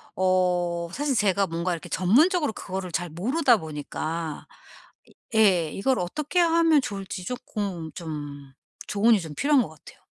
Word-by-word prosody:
어 180 -2 +1
사실 285 +1 -1
제가 200 -3 +2
뭔가 170 +2 -2
이렇게 165 - -7
전문적으로 290 - +3
그거를 185 -2 -5
잘 170 +1 -2
모르다 240 - +2
보니까 155 0 -5 0.9
예 185 -8 +4
이걸 260 +6 0
어떻게 295 - -2
하면 330 -3 +4
좋을지 195 -6 -6
쪼끔 195 -8 -4
좀 145 -4 -7 0.3
조언이 215 +1 +4
좀 160 -2 -7
필요한 285 -1 +3
거 175 - -8
같아요. 160 - -16
185 Hz, 295 characters per minute, -25 LUFS, 170-250 Hz, 0.9 s, 예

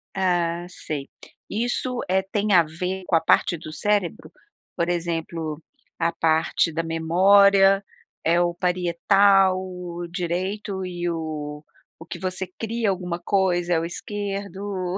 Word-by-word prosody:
Ah, 175 -2 0
sei, 150 -5 -6 0.4
e 220 +3 -1
isso, 250 0 -1
eh, 190 0 +2
tem 210 0 0
a 170 -2 +7
ver 180 +4 -4
com 170 - +1
a 160 - +4
parte 175 - +3
do 155 0 -9
cérebro, 200 +2 -1 0.4
por 170 0 0
exemplo, 165 -2 -3 0.4
a 165 0 +2
parte 160 0 +1
da 165 - 0
memória, 195 +4 +5 0.4
é 170 +2 +3
o 175 0 +1
parietal, 185 +2 +3 0.5
direito 190 +2 -3
e 175 -1 -3
o 155 -2 -5 0.4
o - - -9
que 175 - -7
você 185 +1 -3
cria 225 -1 -1
alguma 180 -2 -2
coisa 175 -2 +1
é 165 - +3
o - - -3
esquerdo, 195 -1 -4
180 Hz, 135 wpm, -24 LUFS, 165-195 Hz, 0.5 s, a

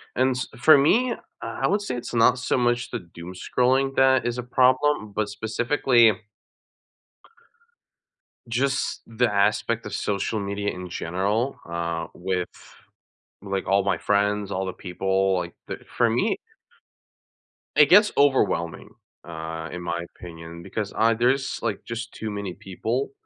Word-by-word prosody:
and 130 0 +2
s 130 - -3
for 155 +5 +8
me, 235 - +3
uh, - - -5 0.3
I - - -3
would 205 +1 +1
say 165 -11 -3
it's 120 - -6
not 120 +2 +4
so 125 - 0
much 120 0 0
the 120 - -2 0.2
doomscrolling 125 +10 0
that 130 -2 +4
is 120 0 -2
a 125 - -3
problem, 130 -2 +2
but 105 0 -1
specifically 115 +2 +3 2.4
just, 130 +3 0
the 115 0 +1
aspect 105 +3 +1
of - - -5
social 105 +2 -1
media 100 0 -2
in 90 0 -7
general, 100 +10 -1
uh, 85 -1 -3
with 90 0 -2 0.9
like 100 -1 -3
all 100 0 +3
my 100 - +1
friends, 105 0 +1
all 95 0 -2
the 95 - -3
people, 95 +1 0
like 85 -1 -5
th - - -5 0.2
for - - +3
me - - +1 1.4
it 150 0 +7
gets 210 +3 +7
overwhelming, 130 - +2 0.4
uh, 80 0 -6
in 90 - -6
my 85 0 -3
opinion, 85 -1 -10
because, 105 +1 -4
uh, 115 +1 +4
there's 125 +4 +1
like 110 -4 -2
just 115 0 -5
too 110 - -5
many 100 -3 -4
people 110 +7 -3
110 Hz, 145 wpm, -24 LUFS, 95-125 Hz, 2.4 s, for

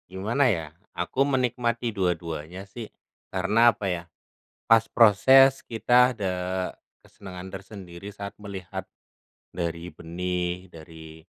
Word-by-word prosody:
Gimana 110 +9 +1
ya? 85 -8 -1 0.3
Aku 135 - -2
menikmati 120 -3 0
dua-duanya 90 -1 -3
sih. 110 +3 -9 0.4
Karena 110 +6 +4
apa 105 - -7
ya, 90 -2 -2 0.6
pas 115 -1 +6
proses 130 +5 +6
kita 125 +2 +3
ada 100 -6 -2 0.7
kesenangan 95 -2 -10
tersendiri 95 -1 -9
saat 100 0 -8
melihat 95 -4 -6 0.7
dari 85 -1 -3
benih, 90 +1 -3
dari 80 -1 -13
95 Hz, 105 wpm, -26 LUFS, 90-115 Hz, 0.7 s, pas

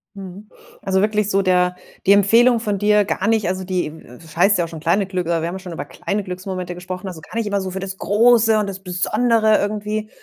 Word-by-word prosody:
Mhm. 195 +2 -10 0.3
Also, 190 -1 0
wirklich 210 0 +1
so 195 -1 +2
der 180 -1 +2 0.3
die 195 - +5
Empfehlung 230 +5 +4
von 210 -3 -2
dir 210 0 +3
gar 190 - -2
nicht 220 -4 +1
also, 185 +1 -2
die, 180 -4 -2
w 160 - -14 0.2
es 155 -1 -15
heißt 195 +4 +4
ja 175 - 0
auch - - -8
schon 165 - -8
kleine 175 +6 +1
Glück 185 -2 -3
aber 170 -1 0
wir 165 - -2
haben 190 +2 -6
schon 180 -2 -9
über 145 -3 -5
kleine 205 +7 -4
Glücksmomente 185 -1 -6
gesprochen, 180 +2 -7
also, 175 -4 -8
gar - - -13
nicht 230 -1 -1
immer 200 -1 -1
so 190 -1 -5
für 190 - -5
das 190 0 -6
Große 225 +3 +4
und 210 -1 0
das 195 -1 -6
Besondere 215 +4 +2
irgendwie 210 +1 -3
195 Hz, 240 wpm, -20 LUFS, 180-210 Hz, 0.3 s, die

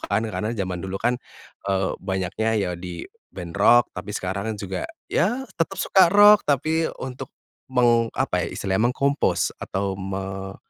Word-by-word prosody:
kan, 100 +2 -1
karena 110 +1 -3
zaman 90 -3 -3
dulu 95 +1 -4
kan, 120 +4 0 0.5
eee, 95 -1 +1
banyaknya 95 +3 -1
ya 95 -4 0
di 90 -2 -7 0.3
band 85 -1 -7
rock. 120 +3 +6
Tapi 95 +2 -7
sekarang 100 +3 -3
juga, 95 -2 -4 0.2
ya 245 +9 +1
tetap 165 +4 -1
suka 190 -1 +4
rock, 205 +2 +7
tapi 155 +3 +1
untuk 130 -1 -6 0.4
meng 120 -2 +3
apa, 110 -9 0
ya, - - -4
istilahnya, 100 +4 +1
meng-compose 140 +2 +1
atau 95 0 -3
me 95 0 -5
105 Hz, 150 wpm, -23 LUFS, 95-130 Hz, 0.5 s, rock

